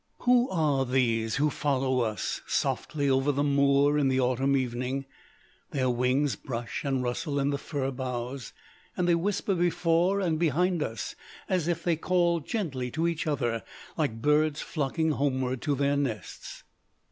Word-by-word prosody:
"Who 245 0 +4
are 150 -6 +1
these 115 -4 +1
who 150 +2 +2
follow 130 -3 0
us 110 -3 -2
softly 145 -2 -1
over 135 +1 +3
the 145 +1 0
moor 140 +1 +3
in 140 - +3
the 130 0 +2
autumn 130 +2 +2
evening? 130 +2 -2 0.6
Their 130 -2 0
wings 125 +3 +1
brush 120 -3 -5
and 135 -2 0
rustle 140 +4 -2
in 140 +1 +1
the 140 - -2
fir 135 -3 -3
boughs, 125 -1 -4 0.5
and 180 - +1
they 175 - +5
whisper 195 +3 0
before 175 +1 +2
and 165 -5 0
behind 175 +2 +1
us, 115 -7 -3 0.3
as 180 -4 0
if 170 -1 -1
they 170 -2 +1
called 170 -2 +1
gently 140 - -2
to 160 +6 0
each 170 -1 -2
other, 120 -6 0 0.3
like 115 -8 -2
birds 150 +1 +3
flocking 160 +1 -1
homeward 130 -3 -1
to 145 -2 0
their 140 +1 +1
nests. 125 -9 -4
140 Hz, 160 wpm, -28 LUFS, 130-160 Hz, 0.6 s, they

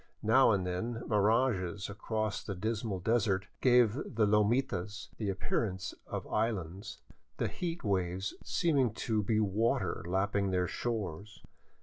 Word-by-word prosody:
Now 125 +5 +6
and 100 -4 +2
then 115 +6 -3
mirages 105 -3 +1
across 110 +1 -3
the 100 -4 -4
dismal 110 0 -2
desert 100 -2 +1 0.2
gave 125 -4 +5
the 115 -4 0
lomitas 105 -1 +1
the 105 -3 -2
appearance 95 0 -2
of - - -4
islands, 105 -2 -2 0.4
the - - 0
heat 175 -1 -4
waves 95 -1 -1
seeming 135 - +1
to 110 -2 0
be 110 +1 +1
water 105 -1 0
lapping 100 +2 +1
their 90 -1 +1
shores. 105 -4 -4
105 Hz, 125 wpm, -32 LUFS, 95-115 Hz, 0.4 s, Now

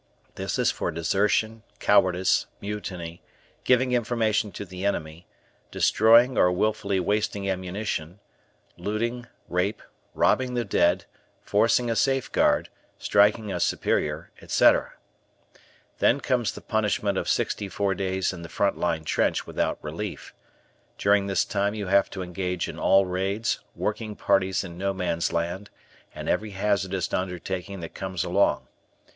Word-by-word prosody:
This - - -3
is - - +3
for - - -3
desertion, 105 +7 0 0.2
cowardice, 95 -2 +3
mutiny, 90 -5 -6 0.4
giving 125 0 +3
information 110 -3 +1
to 100 - -6
the 95 0 -8
enemy, 85 -4 -3 0.4
destroying 115 +4 +4
or 90 - +5
willfully 100 0 0
wasting 100 +1 -1
ammunition, 95 -2 -3 0.6
looting, 120 +4 -3 0.2
rape, 90 +4 -1 0.3
robbing 130 -1 +2
the 120 -1 0
dead, 85 0 +2 0.4
forcing 115 +4 +2
a 115 - 0
safeguard, 135 +2 +2 0.3
striking 105 +1 +3
a 90 - -2
superior, 75 -1 0
etc. - - +3 1.1
Then 135 - +4
comes 125 -5 0
the - - -10
punishment 110 -3 0
of - - -2
sixty 100 - -1
four 100 +2 0
days 95 0 -1
in 90 - -8
the 85 - -9
front 100 -1 0
line 85 -2 0
trench - - 0
without - - -1
relief. 85 +7 -6 0.6
During 100 0 +3
this 95 -2 +1
time 100 +1 -1
you 105 -2 -4
have 100 +1 +3
to 95 - -5
engage 90 0 -3
in - - -7
all 95 0 +4
raids, 100 +5 -1 0.2
working 110 0 -3
parties 95 -2 +1
in 85 -2 -9
No 100 0 -1
Man's 85 -3 -1
Land, 85 +4 -2 0.5
and - - -6
every 105 -1 -1
hazardous 95 -3 0
undertaking 90 +1 -3
that 80 - -7
comes 95 -2 -3
along. 95 +3 +1
100 Hz, 135 wpm, -26 LUFS, 90-105 Hz, 1.1 s, or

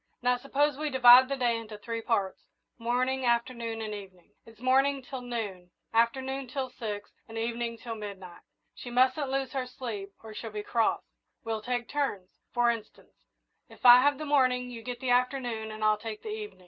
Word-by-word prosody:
Now, 250 0 +4
suppose 280 +2 0
we 305 0 -1
divide 255 -1 +8
the 275 - 0
day 240 -2 +2
into 220 -2 -8
three 230 +2 -5
parts 205 -5 -1 0.3
morning, 255 +3 0
afternoon, 235 -2 0
and 215 -1 -4
evening. 190 -4 -11 0.2
It's 225 -1 -16
morning 270 +2 +2
till 260 0 -7
noon, 210 -7 -5 0.2
afternoon 260 +4 +1
till 260 0 -4
six, 210 -4 -6 0.2
and 225 - -7
evening 230 0 -2
till 230 0 -6
midnight. 195 -5 -8 0.3
She 245 - -9
mustn't 260 +3 +2
lose 270 -1 -1
her 260 -2 -2
sleep, 220 -6 -6
or 220 -1 -9
she'll 225 +1 -6
be 210 -1 -5
cross. 230 +1 +1 0.4
We'll 225 -1 -2
take 245 +1 -2
turns. 265 -11 -2 0.2
For 240 0 +3
instance, 225 -2 -9 0.6
if - - -14
I 245 0 +10
have 285 +1 +3
the 305 - -5
morning, 255 -3 +2
you 230 -2 -7
get 245 +1 -6
the 255 -1 0
afternoon, 245 -3 0
and 215 0 -6
I'll 215 0 +3
take 220 -1 -7
the - - -6
evening. 425 0 -6
240 Hz, 185 wpm, -29 LUFS, 220-260 Hz, 0.6 s, I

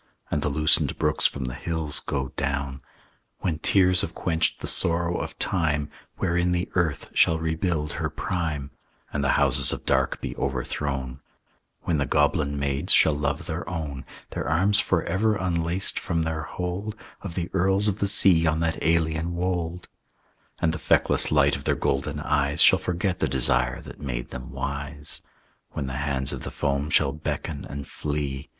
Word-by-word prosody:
And 75 - 0
the 75 - 0
loosened 75 +2 +3
brooks - - +3
from 70 - -5
the 60 - -4
hills 80 -1 +1
go 65 -2 -3
down, 70 -1 -3 0.6
When 80 -3 -1
tears 90 0 +3
have 80 - -4
quenched 80 -2 0
the - - -6
sorrow 85 +1 +1
of - - -6
time, 75 -5 0 0.3
Wherein 85 +1 +1
the 90 0 -1
earth 85 -5 -1
shall 80 - +4
rebuild 80 -1 -1
her - - -2
prime, 80 -7 -3 0.4
And 70 - -1
the - - +3
houses 70 -1 +6
of - - -5
dark - - +1
be - - -5
overthrown; 65 0 -3 0.6
When 80 -4 0
the 70 - 0
goblin 75 -1 +1
maids 70 0 0
shall 80 - +6
love 75 0 -2
their 85 +1 -4
own, 75 -6 -4 0.3
Their - - -3
arms 95 +6 +3
forever 95 +5 +1
unlaced 85 0 0
from 85 -1 -1
their 80 -1 -3
hold 90 +4 -4 0.3
Of 90 -4 -7
the 90 0 -3
earls 95 +2 +2
of 105 0 0
the 100 - +1
sea 90 -4 +5
on 80 0 +1
that 80 0 -1
alien 80 +1 +1
wold, 90 -1 -2 0.7
And 80 - +1
the 80 - -4
feckless - - +3
light 70 -1 +4
of 70 - -8
their - - +2
golden 75 +2 -1
eyes 70 -1 +2
Shall - - +6
forget 90 +1 -2
the 75 - +1
desire 65 -1 +2
that - - -12
made - - -4
them 65 0 -7
wise; 70 +2 -3 0.5
When 75 - -3
the 65 0 -4
hands 70 -2 -1
of - - -6
the - - -5
foam 70 0 -1
shall 80 -3 +3
beckon 75 -1 -4
and 70 0 -7
flee. 70 -3 -4
80 Hz, 170 wpm, -25 LUFS, 70-85 Hz, 0.7 s, houses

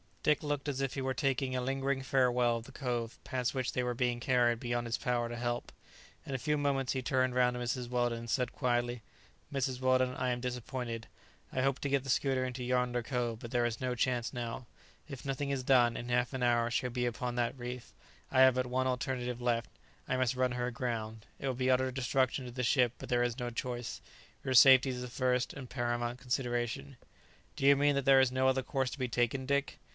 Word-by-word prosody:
Dick 150 0 +2
looked 145 -1 -2
as 135 -1 -2
if 135 -2 -1
he 135 - -3
were 130 0 -1
taking 135 -2 0
a 125 - 0
lingering 135 +1 -1
farewell 125 -3 +2
of 115 - -8
the - - -12
cove 120 -4 -3
past 125 -3 -2
which 130 -2 -1
they 125 - 0
were 125 0 -1
being 120 -1 0
carried 120 -2 +2
beyond 120 0 -2
his 115 - -1
power 120 -1 0
to 120 - -5
help. 120 0 -3 0.5
In 140 - -5
a - - 0
few 150 +3 0
moments 135 -3 0
he 130 - -2
turned 130 +1 +1
round 125 -1 +3
to - - -4
Mrs. 125 0 -2
Weldon, 120 -1 0
and 115 0 -8
said 125 0 0
quietly, 120 -2 -1 0.5
"Mrs. 130 -2 -1
Weldon, 130 0 +2
I 130 - -1
am 125 0 -1
disappointed. 125 -2 -4 0.4
I 130 - -1
hoped 135 0 +1
to 140 - 0
get 140 -1 +1
the 135 - -8
schooner 130 0 +2
into 125 0 -4
yonder 125 0 +1
cove; 120 -3 -2
but 120 - -8
there 120 -1 +2
is 120 0 -2
no 130 -1 0
chance 125 0 0
now; 120 0 -5 0.4
if 135 -4 -8
nothing 140 +1 -2
is 135 -2 -1
done, 125 -3 +4
in 120 - -6
half 125 +1 +1
an 130 -1 -2
hour 120 -1 +3
she 120 - 0
will 125 - -3
be 125 -1 0
upon 120 0 -3
that 120 +2 -1
reef. 125 0 -7 0.4
I 130 - +4
have 130 -1 +7
but 130 0 0
one 130 +1 0
alternative 125 -1 -2
left. 120 -1 0 0.4
I 130 - 0
must 130 0 +1
run 130 0 +1
her 125 0 -1
aground. 115 -3 -4
It 140 - -3
will 130 - 0
be 130 +1 0
utter 130 0 +3
destruction 130 0 0
to 125 - -7
the 125 +1 -3
ship, 125 -1 +3
but - - -9
there 120 -1 +3
is 120 +1 -2
no 120 -1 -2
choice. 120 0 -4 0.4
Your 130 - -1
safety 130 +1 +8
is 125 -1 -3
the 125 - -4
first 125 0 0
and 130 -3 -8
paramount 120 -1 -2
consideration." 120 - -2 0.6
"Do 135 - -2
you 140 0 +8
mean 145 +1 +3
that 140 -1 0
there 135 -1 +7
is 130 -1 +3
no 130 +1 +2
other 130 0 +2
course 135 -1 -1
to - - -8
be 130 - 0
taken, 120 +2 0
Dick?" 140 +1 -1
125 Hz, 230 wpm, -32 LUFS, 120-130 Hz, 0.6 s, safety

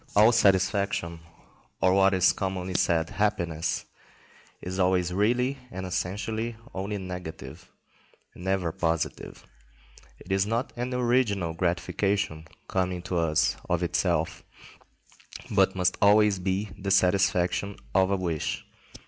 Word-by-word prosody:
All 105 +3 +7
satisfaction, 100 -5 +2 0.6
or 95 +1 +3
what 95 0 +4
is 95 0 +4
commonly 95 -1 -3
called 85 -2 +1
happiness, 85 -6 -1 0.7
is 95 +1 -5
always 90 -1 +2
really 125 +7 +1
and 95 -5 -6
essentially 105 +6 -3 0.2
only 100 +2 -3
negative, 90 -5 -8 0.6
and 90 - -12
never 95 -3 0
positive. 80 -1 -3 0.7
It 95 - -11
is 95 +1 +2
not 115 +5 -2
an 125 +1 -3
original 120 -8 +1
gratification 90 0 -1 0.2
coming 90 -1 -1
to 95 -1 -2
us 80 -2 +1
of 85 0 +1
itself, 85 -2 0 1.1
but 95 -2 +3
must 90 -1 +1
always 105 -1 +5
be 95 +2 -2
the 100 0 -3
satisfaction 95 +1 +2 0.2
of 95 -1 +3
a 100 - +2
wish. 85 -4 -3
95 Hz, 120 wpm, -27 LUFS, 90-100 Hz, 1.1 s, All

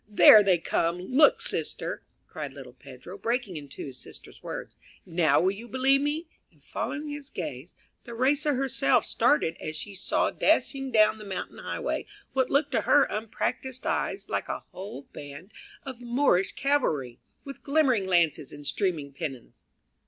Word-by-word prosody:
there 210 0 +9
they 190 -3 +4
come; 165 +1 0
look, 260 +12 +4
sister!" - - -3 0.2
cried - - -7
little - - -11
Pedro, - - -12
breaking 235 - -1
into 145 -3 -7
his 135 -3 -8
sister's - - -11
words; - - -7 0.3
"now 165 -4 +3
will 185 +2 +3
you 215 +4 -9
believe 270 +2 +3
me?" 300 +3 -2 0.2
and - - -28
following 300 0 -4
his 290 -1 -7
gaze, 150 -2 -6 0.3
Theresa 275 +5 +1
herself 270 +1 +2
started 165 - +2
as 155 - -4
she 200 +6 -6
saw 195 - 0
dashing 270 -1 +1
down 215 -1 +4
the - - -9
mountain 195 -2 -6
highway - - -3 0.3
what 260 -1 +1
looked 285 0 +2
to 230 - +2
her 290 - +5
unpractised 235 +4 -3
eye - - 0
like - - -2
a - - -4
whole 185 -7 -8
band 145 +7 -10 0.3
of 260 -3 -8
Moorish 235 -7 +2
cavalry 155 - 0 0.2
with 275 -1 -9
glimmering 275 -9 +2
lances 165 -6 +2
and 145 0 -10
streaming 150 -2 -1
pennons. 135 -4 -7
215 Hz, 155 wpm, -27 LUFS, 165-270 Hz, 0.3 s, there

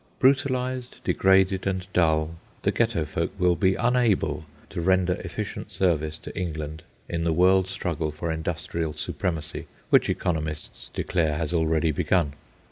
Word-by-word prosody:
Brutalised, 130 -2 +1
degraded, 95 0 +3
and 95 -1 -1
dull, 80 -1 +2 0.3
the - - +3
Ghetto - - +1
folk - - -2
will 90 -1 +4
be 95 +3 +3
unable 110 -11 +1 0.3
to 85 - -3
render 95 0 +3
efficient - - -5
service 80 -4 +1
to - - -10
England 80 -3 -4 0.3
in 85 -1 -2
the 85 - +2
world 95 +3 +4
struggle 85 -4 -2
for 80 +2 -3
industrial 80 0 -2
supremacy 80 -3 -3 0.2
which - - +5
economists 80 -3 -3
declare 80 -4 0
has 80 +1 -2
already 80 -1 +2
begun. 75 -1 +1
85 Hz, 135 wpm, -26 LUFS, 80-95 Hz, 0.3 s, which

